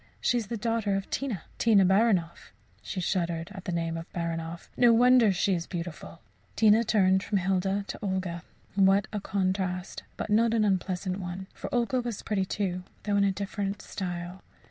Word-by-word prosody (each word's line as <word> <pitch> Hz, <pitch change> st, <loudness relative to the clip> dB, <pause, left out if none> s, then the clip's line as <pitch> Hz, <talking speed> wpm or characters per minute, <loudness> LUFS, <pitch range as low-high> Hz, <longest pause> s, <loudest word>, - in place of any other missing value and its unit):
She 245 Hz, -, +2 dB
is 220 Hz, -, -6 dB
the 230 Hz, -, -3 dB
daughter 220 Hz, -2 st, 0 dB
of 195 Hz, 0 st, -4 dB
Tina 250 Hz, -11 st, -2 dB, 0.2 s
Tina 210 Hz, -5 st, +5 dB
Baranoff. 190 Hz, -3 st, +2 dB, 0.3 s
[She 190 Hz, -, -5 dB
shuddered 170 Hz, -1 st, -1 dB
at 190 Hz, -1 st, -9 dB
the -, -, -2 dB
name 165 Hz, -1 st, -2 dB
Baranoff.] 165 Hz, 0 st, -4 dB
No 240 Hz, -1 st, +6 dB
wonder 245 Hz, -2 st, +6 dB
she 190 Hz, +1 st, +1 dB
is 170 Hz, -2 st, -2 dB
beautiful!" 170 Hz, -1 st, -7 dB, 0.3 s
Tina 220 Hz, +1 st, +5 dB
turned 190 Hz, -4 st, +3 dB
from 200 Hz, +1 st, -1 dB
Hilda 195 Hz, +2 st, 0 dB
to -, -, -6 dB
Olga. 185 Hz, -4 st, -2 dB, 0.3 s
What 195 Hz, 0 st, +4 dB
a 210 Hz, -, -1 dB
contrast, 185 Hz, -1 st, -2 dB, 0.2 s
but 220 Hz, -, -4 dB
not 230 Hz, +2 st, +4 dB
an 215 Hz, -2 st, +3 dB
unpleasant 185 Hz, -1 st, -1 dB
one 180 Hz, +1 st, -5 dB
for -, -, -7 dB
Olga 245 Hz, +1 st, +1 dB
was 235 Hz, -4 st, -5 dB
pretty, 195 Hz, -3 st, 0 dB
too, 185 Hz, -2 st, -2 dB, 0.2 s
though 205 Hz, -1 st, 0 dB
in 200 Hz, -, +4 dB
a 200 Hz, -, +3 dB
different 200 Hz, +1 st, -3 dB
style. 180 Hz, -1 st, -5 dB
195 Hz, 175 wpm, -28 LUFS, 180-210 Hz, 0.3 s, No